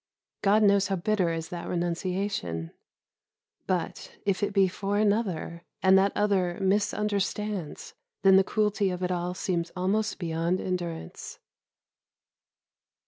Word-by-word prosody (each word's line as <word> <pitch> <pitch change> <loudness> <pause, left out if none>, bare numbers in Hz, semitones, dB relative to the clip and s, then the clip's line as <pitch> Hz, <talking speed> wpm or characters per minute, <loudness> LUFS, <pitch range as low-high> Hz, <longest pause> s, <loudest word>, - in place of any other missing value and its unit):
God 210 +2 +4
knows 200 -1 +4
how 195 - 0
bitter 185 -1 +1
is 165 -1 -4
that 175 -1 -6
renunciation, 175 - -2 1.0
but, 180 -3 -3
if 195 -2 +1
it 205 0 0
be 195 -1 +4
for 200 +2 -2
another, 200 -6 0 0.2
and 190 0 +6
that 195 +1 +4
other 190 -4 +1
misunderstands, 205 -2 -1 0.3
then 190 -1 +7
the 190 - +6
cruelty 210 -1 +1
of 180 0 -4
it 180 - 0
all 180 0 -2
seems 170 -2 -2
almost 205 +4 0
beyond 170 +1 -1
endurance. 175 - -5
190 Hz, 125 wpm, -27 LUFS, 175-205 Hz, 1.0 s, then